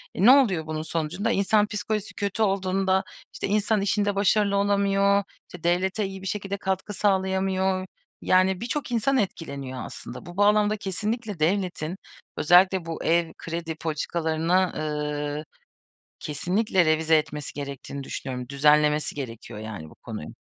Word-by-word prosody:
E, 190 - +2
ne 250 - +10
oluyor 195 - +4
bunun 155 0 -3
sonucunda? 170 +7 -2
İnsan 205 +1 +3
psikolojisi 210 0 -3
kötü 205 +1 -1
olduğunda, 190 -1 +1 0.3
işte, - - -3
insan 210 +1 +1
işinde 205 0 +1
başarılı 200 0 +3
olamıyor, 200 0 +3 0.3
işte, 175 - -11
devlete 185 +4 +1
iyi 190 0 -6
bir 190 - -6
şekilde 200 +1 -3
katkı 190 +2 -2
sağlayamıyor, 190 -1 +1 0.4
yani, 185 +1 +3
birçok 250 +1 -3
insan 250 +4 +2
etkileniyor 140 - -3
aslında. - - -9
Bu 175 +2 -10
bağlamda 210 +1 +4
kesinlikle 210 +1 -3
devletin, 175 -1 0 0.4
özellikle 180 +2 +5
bu 165 -1 -5
ev 170 0 +2
kredi 165 -1 -4
politikalarını, 160 +1 -1 0.2
ııı, 150 -1 -2 0.8
kesinlikle 180 +4 +1
revize 160 0 +4
etmesi 150 -1 -4
gerektiğini 140 0 -6
düşünüyorum. 125 -2 -5
Düzenlemesi 150 +1 +3
gerekiyor, 115 -5 -7
yani, 105 -8 -7
bu - - -17
konuyu. 110 -10 -8
185 Hz, 135 wpm, -25 LUFS, 155-200 Hz, 0.8 s, ne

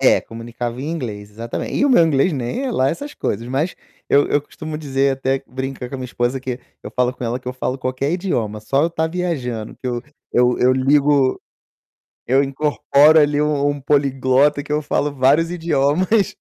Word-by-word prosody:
É, - - +5
comunicava 120 +1 -6
em 145 +4 -3
inglês, 105 -10 -5
exatamente, 115 +3 -5
e - - +2
o 285 - +3
meu 175 -10 +6
inglês 155 +3 +2
nem 130 - -3
é 260 - -1
lá 135 - +2
essas 285 - -5
coisas 115 +4 -3
mas, 145 +8 -1 0.3
eu 145 +1 +4
eu 145 - +2
costumo 155 +1 -7
dizer, 135 -2 +1
até 135 0 -1
brinca 130 -1 -5
com 135 - -8
a - - -8
minha 130 - -5
esposa, 120 +1 -1
que 130 -1 -5 0.2
eu - - -6
falo 125 0 +1
com 125 - -7
ela 120 +2 -2
que 125 - -7
eu - - -3
falo 130 0 -3
qualquer 130 +3 -2
idioma, 120 - -2
só 135 +7 +1
eu 170 - 0
tá 160 -1 -1
viajando, 140 -11 -3
que 130 - -5
eu 120 -1 -2 0.3
eu 125 0 +3
eu 125 +1 +5
ligo 140 0 +3 0.9
eu 135 +3 +3
incorporo 145 +2 +3
ali 145 0 +2
um 150 -1 +1
um 145 - -4
poliglota 140 0 +2
que 145 - -6
eu 150 - +1
falo 145 0 -1
vários 140 +5 +3
idiomas, 170 +5 +1
135 Hz, 200 wpm, -20 LUFS, 125-150 Hz, 0.9 s, meu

